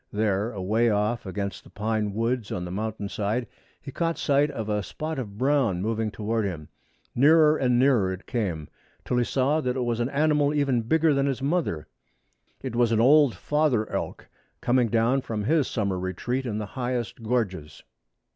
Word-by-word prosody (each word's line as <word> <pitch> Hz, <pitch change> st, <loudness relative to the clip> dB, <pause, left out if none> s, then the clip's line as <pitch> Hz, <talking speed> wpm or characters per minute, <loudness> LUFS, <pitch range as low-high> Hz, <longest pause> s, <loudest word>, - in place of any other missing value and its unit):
There, 105 Hz, +1 st, 0 dB
away 110 Hz, +3 st, +1 dB
off 105 Hz, +1 st, 0 dB
against 100 Hz, +1 st, -4 dB
the -, -, -16 dB
pine 105 Hz, 0 st, -2 dB
woods 115 Hz, 0 st, -1 dB
on 90 Hz, -1 st, -3 dB
the 90 Hz, -, -6 dB
mountain 105 Hz, +1 st, -3 dB
side, 105 Hz, +5 st, -2 dB, 0.3 s
he 135 Hz, -, -9 dB
caught 165 Hz, +3 st, -1 dB
sight 145 Hz, +1 st, +2 dB
of 110 Hz, -6 st, -5 dB
a 105 Hz, -1 st, 0 dB
spot 155 Hz, +7 st, -5 dB
of 105 Hz, -5 st, -6 dB
brown 130 Hz, -7 st, +2 dB
moving 110 Hz, +2 st, -1 dB
toward 110 Hz, +1 st, -2 dB
him. 85 Hz, -7 st, -5 dB, 0.4 s
Nearer 155 Hz, +3 st, +5 dB
and 125 Hz, -4 st, +2 dB
nearer 120 Hz, -8 st, +3 dB
it 95 Hz, +1 st, -7 dB
came, 90 Hz, -, -2 dB, 0.4 s
till 125 Hz, -, 0 dB
he 120 Hz, -, +3 dB
saw 140 Hz, +5 st, +1 dB
that 125 Hz, -3 st, -1 dB
it 130 Hz, -, -1 dB
was 120 Hz, -1 st, -1 dB
an 120 Hz, +1 st, 0 dB
animal 150 Hz, 0 st, +2 dB
even 140 Hz, -5 st, +2 dB
bigger 160 Hz, +6 st, +2 dB
than 140 Hz, 0 st, +1 dB
his 135 Hz, -1 st, -2 dB
mother. 145 Hz, -, -1 dB, 0.8 s
It 130 Hz, -3 st, -4 dB
was 120 Hz, -1 st, +3 dB
an 110 Hz, -, +2 dB
old 140 Hz, -1 st, +5 dB
father 140 Hz, -, +1 dB
elk -, -, -4 dB, 0.3 s
coming 125 Hz, -1 st, +2 dB
down 115 Hz, +4 st, +2 dB
from 110 Hz, -4 st, -4 dB
his 150 Hz, +4 st, +2 dB
summer 100 Hz, -4 st, -1 dB
retreat 120 Hz, +8 st, -3 dB
in 105 Hz, -3 st, -2 dB
the 105 Hz, -, -3 dB
highest 120 Hz, 0 st, -4 dB
gorges. 105 Hz, -10 st, -2 dB
115 Hz, 185 wpm, -26 LUFS, 105-135 Hz, 0.8 s, Nearer